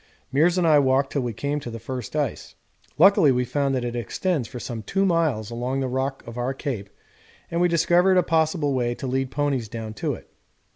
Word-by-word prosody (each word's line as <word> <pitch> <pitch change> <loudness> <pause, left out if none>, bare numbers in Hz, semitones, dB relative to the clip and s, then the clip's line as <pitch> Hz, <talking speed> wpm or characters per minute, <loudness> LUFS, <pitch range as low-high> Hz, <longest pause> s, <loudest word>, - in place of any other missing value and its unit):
Meares 170 +6 +3
and 180 - +2
I 150 -2 +6
walked 135 0 +2
till 140 - 0
we 120 -1 -2
came 140 +6 -2
to 130 - -7
the 115 - -6
first 125 +3 -6
ice. 145 -5 -3 0.4
Luckily 185 -3 +6
we 125 0 +1
found 140 +1 0
that 125 -1 -1
it 120 0 -3
extends 125 - -1
for 125 - -8
some 115 -2 -5
2 195 - 0
miles 155 - +1
along 125 +3 -2
the 135 - -1
rock 130 +2 -2
of 115 +1 -7
our 130 +2 -1
Cape, 120 -9 -4 0.6
and 170 +1 0
we 180 - +5
discovered 175 +2 +3
a 180 - +5
possible 160 -3 +1
way 120 -2 0
to 135 - -7
lead 130 0 -1
ponies 135 -6 -1
down 110 -1 -6
to - - -2
it. - - -14
135 Hz, 220 wpm, -24 LUFS, 120-155 Hz, 0.6 s, I